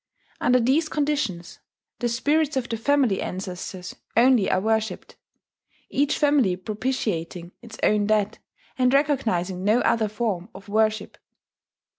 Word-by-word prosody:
Under 250 +1 +3
these 280 +7 +2
conditions, 280 - -2 0.4
the 240 - 0
spirits 290 +5 +1
of 255 -2 -1
the 230 - -3
family 250 -3 +1
ancestors 185 0 -6 0.2
only 245 -3 +5
are 185 - +2
worshipped; 220 +2 -2 0.8
each 285 +1 +1
family 285 -11 +3
propitiating 185 -5 -3
its 230 -2 -11
own 210 -1 +3
dead, 210 -1 +1 0.4
and 250 0 +4
recognizing 220 -11 0
no 215 +4 +3
other 225 -2 +2
form 210 -3 -3
of 195 +1 -12
worship. 215 0 0
220 Hz, 125 wpm, -24 LUFS, 195-265 Hz, 0.8 s, only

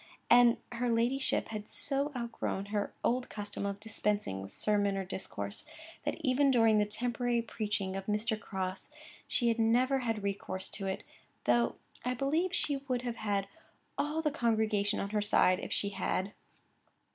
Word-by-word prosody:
And 240 -1 +7
her 245 0 -1
ladyship 240 +4 +1
had 215 -1 -5
so 280 +1 0
outgrown 235 -4 -3
her 205 -1 0
old 250 +1 +1
custom 205 -1 -4
of 200 0 -3
dispensing 205 - -1
with 95 - -7
sermon 205 -2 +2
or 195 - -2
discourse, 100 - -4 0.4
that - - 0
even 275 +1 +3
during 225 -4 +5
the 210 - +3
temporary 240 +2 0
preaching 210 -4 -2
of 195 0 -5
Mr. 215 +1 0
Crosse, 190 -2 -4 0.4
she 240 - +1
had 230 0 +1
never 250 +4 +3
had 225 -4 -2
recourse 195 -1 -3
to 195 -1 -4
it, 190 - -3 0.4
though 120 -1 +3 0.3
I 250 0 0
believe 310 +8 +1
she 290 -5 +1
would 250 -2 0
have 240 -1 -3
had 205 -3 0 0.5
all 305 +2 -1
the 300 - +2
congregation 220 -4 +1
on 200 - -3
her 210 -1 +1
side 185 -2 +4
if - - -6
she 200 - +1
had. 195 0 -1
220 Hz, 165 wpm, -32 LUFS, 200-245 Hz, 0.5 s, And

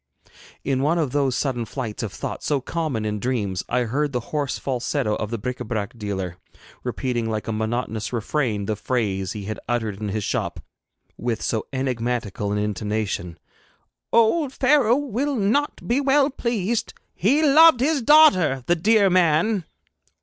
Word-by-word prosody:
In 135 -1 0
one 155 +5 +2
of 155 -6 0
those 135 -3 +1
sudden 130 -4 -1
flights 115 -2 -5
of - - -4
thought - - -5
so 145 -2 +1
common 135 -6 -3
in 105 0 -2
dreams 105 -6 -2
I 125 +1 +1
heard 140 +5 -1
the 125 - 0
hoarse 145 -5 -1
falsetto 125 -2 -1
of 105 - -4
the 115 - -3
bric 125 +4 -4
Ă 120 - -5
brac 110 -2 -3
dealer, 95 -5 -4 0.5
repeating 120 -3 -2
like 110 -1 -3
a - - -1
monotonous 110 0 -2
refrain 115 -3 -1
the 110 - -1
phrase 100 -6 -2
he 105 - -6
had 110 +1 -5
uttered 110 -4 -2
in 105 - -2
his 105 +1 -2
shop - - -2 0.6
with 115 -2 -2
so 110 -2 -1
enigmatical 120 -6 -2
an 105 - 0
intonation: 105 -4 -2 0.7
'Old 255 +5 +3
Pharaoh 260 -4 +4
will 280 +1 -1
not 240 +7 0
be 245 +4 +2
well 280 +1 +3
pleased 235 -3 -2 0.2
He 270 - +2
loved 310 -1 +7
his 285 +2 +1
daughter, 195 - +5
the 175 - +3
dear 205 +4 +4
man!' 180 +2 +2
130 Hz, 165 wpm, -23 LUFS, -, 0.7 s, loved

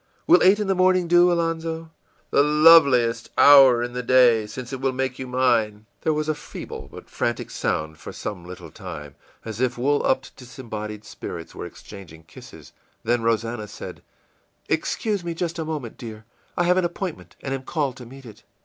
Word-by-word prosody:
Will 345 - +6
eight 195 +3 +5
in 210 - -1
the 195 - +1
morning 185 -1 +2
do, 175 +1 +5
Alonzo?î 165 -1 -2 0.4
ìThe 150 +2 +3
loveliest 140 -8 +6
hour 135 -4 +7
in 120 0 -5
the 125 - -3
day 120 -3 +4
since 125 +4 -8
it 130 - -5
will 135 -1 0
make 130 0 -3
you 130 - -5
mine.î 120 -5 +1 0.2
There 160 - +1
was 155 0 -2
a 155 - +1
feeble 150 - -9
but - - -12
frantic - - -3
sound 80 0 -3
for - - -8
some 100 -5 -6
little 90 -2 -10
time, 75 -1 -9 0.3
as 110 +1 -6
if 125 -1 0
wool 145 +4 +1
lipped, 130 +1 -1
disembodied 110 -4 -8
spirits 85 -1 -8
were - - -7
exchanging 85 -6 -13
kisses; - - -14 0.3
then 120 +1 +1
Rosannah 115 -1 -1
said, - - -9 0.7
ìExcuse 195 +5 -1
me 170 -1 -4
just 170 0 -3
a 160 - -3
moment, 150 -7 -6
dear; 110 -2 -9 0.3
I 175 - +2
have 180 +1 +3
an 185 - +2
appointment, 175 0 -6
and 135 - -3
am 135 - -3
called 140 -2 -2
to 125 - -10
meet 135 +2 -13
it. 110 -3 -13
130 Hz, 185 wpm, -23 LUFS, 115-160 Hz, 0.7 s, hour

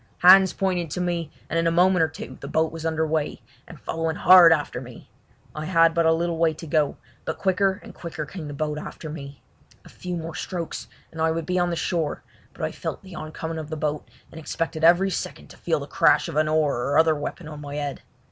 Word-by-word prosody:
Hands 190 +1 +8
pointed 180 -4 -1
to 165 - -4
me, 175 -3 -1 0.2
and 165 - 0
in 165 - +1
a - - +3
moment 180 +1 +4
or 160 - +4
two 160 - -9
the - - -7
boat 160 0 +1
was 165 0 -4
under 160 0 0
weigh, 155 -1 -2 0.2
and - - -12
following 165 0 -2
hard 180 -1 +8
after 145 -5 0
me. 125 -2 -12 0.4
I 155 0 -5
had 165 -1 +4
but 170 -1 +2
a - - +5
little 165 0 0
way 165 -1 +2
to 165 - -9
go, 150 -2 +1 0.3
but - - -4
quicker 190 +1 +1
and - - -11
quicker 160 -3 -6
came 165 -2 -8
the 145 - -6
boat 150 +1 -2
after 155 0 -8
me. 140 -3 -9 0.4
A - - -13
few 180 -1 -5
more 165 0 -6
strokes 170 0 -5 0.2
and 160 - -6
I 160 - +3
would 165 0 -2
be 180 +2 0
on 175 0 +1
the 170 - -1
shore, 165 -3 -2 0.3
but - - -8
I - - -1
felt - - -6
the 190 -2 -12
oncoming 160 0 -5
of 155 -1 -7
the 155 - -4
boat, 150 0 -3 0.2
and 160 - -9
expected 160 0 -3
each 180 +3 +5
second - - -6
to - - -14
feel - - 0
the - - -6
crash - - +3
of - - -6
an 155 0 +2
oar 155 -3 +2
or 130 +4 0
other 160 0 +5
weapon 150 +2 -5
on 150 -1 -8
my 145 0 -7
head. 145 -1 -4
160 Hz, 240 wpm, -24 LUFS, 155-175 Hz, 0.4 s, Hands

